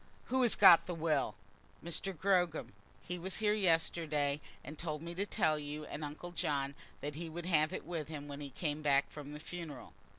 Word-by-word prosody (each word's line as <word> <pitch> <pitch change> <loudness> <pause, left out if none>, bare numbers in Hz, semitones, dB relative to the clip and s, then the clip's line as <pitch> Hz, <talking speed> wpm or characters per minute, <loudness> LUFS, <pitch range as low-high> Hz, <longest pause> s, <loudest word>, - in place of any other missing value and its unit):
Who 260 +1 +3
has 240 -3 +5
got 170 - +8
the 175 - -3
will?" 155 -8 +1 0.5
"Mr. 170 +3 -1
Gogram. 180 -2 +1 0.3
He 180 0 -4
was 190 +2 -3
here 210 -1 +3
yesterday, 165 -6 +1 0.2
and 150 - -7
told 155 -2 -3
me 170 +1 -5
to 200 +4 -1
tell 155 -4 +2
you 150 +1 -5
and 150 - -6
uncle 150 +4 -6
John 140 -4 -1 0.3
that 145 +1 -3
he 165 +2 -5
would 170 +2 -6
have 155 -3 +3
it - - -5
with 165 -4 -3
him 150 -2 -6
when 145 0 -7
he 140 - -5
came 150 +2 -2
back 140 -2 +3
from 145 -1 -8
the 150 - -7
funeral." 160 -4 -7
155 Hz, 200 wpm, -35 LUFS, 145-175 Hz, 0.5 s, got